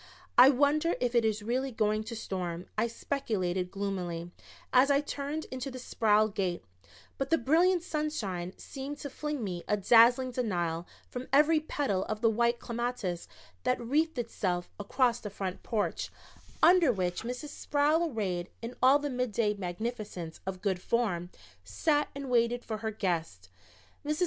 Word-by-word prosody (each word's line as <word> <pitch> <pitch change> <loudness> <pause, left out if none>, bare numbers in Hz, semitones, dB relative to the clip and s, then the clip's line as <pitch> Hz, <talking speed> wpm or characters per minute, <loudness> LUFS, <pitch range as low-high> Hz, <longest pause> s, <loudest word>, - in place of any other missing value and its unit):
"I 250 +2 +9
wonder 295 +5 +3
if 245 -1 0
it 235 -1 +4
is 215 -1 0
really 255 +4 -1
going 215 -1 +1
to 230 +1 -5
storm," 180 -4 -4
I 220 +2 +1
speculated 190 -8 -2
gloomily, 180 -4 -4 0.4
as 260 +2 +6
I 280 0 +5
turned 290 +1 -4
into 255 +1 -4
the 255 - -7
Sproul 215 -4 +2
gate, 195 -4 -2 0.6
but 270 0 -1
the 325 - +4
brilliant 340 +7 +3
sunshine 210 - -3
seemed 275 +1 -7
to 285 - -6
fling 300 -3 -3
me 180 -4 -4
a 210 - +2
dazzling 240 +5 +5
denial 175 -9 -1 0.2
from 250 +1 -6
every 300 +3 +5
petal 280 -11 -1
of 215 0 -4
the 225 - +4
white 235 +2 +2
clematis 235 -8 -3 0.3
that 250 - +1
wreathed 290 +6 0
itself 185 -7 -2
across 240 +4 +1
the 210 - -6
front 190 -2 -5
porch, 220 -3 -2 0.5
under 345 -6 +7
which 180 -5 -1
Mrs. 250 +6 -5
Sproul, 300 +4 +1
arrayed 185 -6 -2
in 235 +2 -4
all 265 +2 +7
the 290 -1 -3
midday 235 -4 0
magnificence 200 -2 -5
of 190 0 -4
good 190 -3 0
form, 185 -8 0 0.3
sat 295 -2 +1
and 280 -1 -5
waited 240 0 +2
for 220 - -3
her 220 +1 -3
guests. 165 - -3 0.5
Mrs. 300 +1 -1
235 Hz, 160 wpm, -30 LUFS, 195-275 Hz, 0.6 s, I